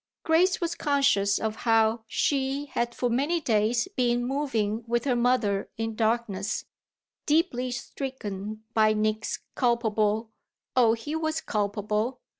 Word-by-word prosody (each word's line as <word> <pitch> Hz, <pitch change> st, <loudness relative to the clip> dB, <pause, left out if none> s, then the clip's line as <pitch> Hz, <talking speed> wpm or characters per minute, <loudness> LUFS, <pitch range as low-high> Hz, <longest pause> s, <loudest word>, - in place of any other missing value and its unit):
Grace 355 Hz, +4 st, +3 dB
was 340 Hz, -2 st, -1 dB
conscious 280 Hz, -11 st, +2 dB
of 220 Hz, 0 st, -2 dB
how 225 Hz, -1 st, +2 dB
she 275 Hz, +3 st, 0 dB
had 235 Hz, 0 st, -1 dB
for 250 Hz, -, 0 dB
many 280 Hz, +8 st, +1 dB
days 230 Hz, -3 st, +1 dB
been 240 Hz, -1 st, +1 dB
moving 235 Hz, -6 st, -1 dB
with 235 Hz, +2 st, 0 dB
her 255 Hz, -3 st, +2 dB
mother 235 Hz, -5 st, +1 dB
in 225 Hz, 0 st, -2 dB
darkness, 220 Hz, -2 st, -1 dB, 0.6 s
deeply 255 Hz, -5 st, +2 dB
stricken 215 Hz, -5 st, -5 dB
by 215 Hz, -1 st, +4 dB
Nick's 215 Hz, +1 st, -1 dB
culpable 220 Hz, -2 st, +1 dB, 0.4 s
oh 235 Hz, -3 st, +5 dB
he 265 Hz, +7 st, -4 dB
was 320 Hz, 0 st, -1 dB
culpable! 210 Hz, +3 st, -1 dB
235 Hz, 125 wpm, -27 LUFS, 215-265 Hz, 0.6 s, oh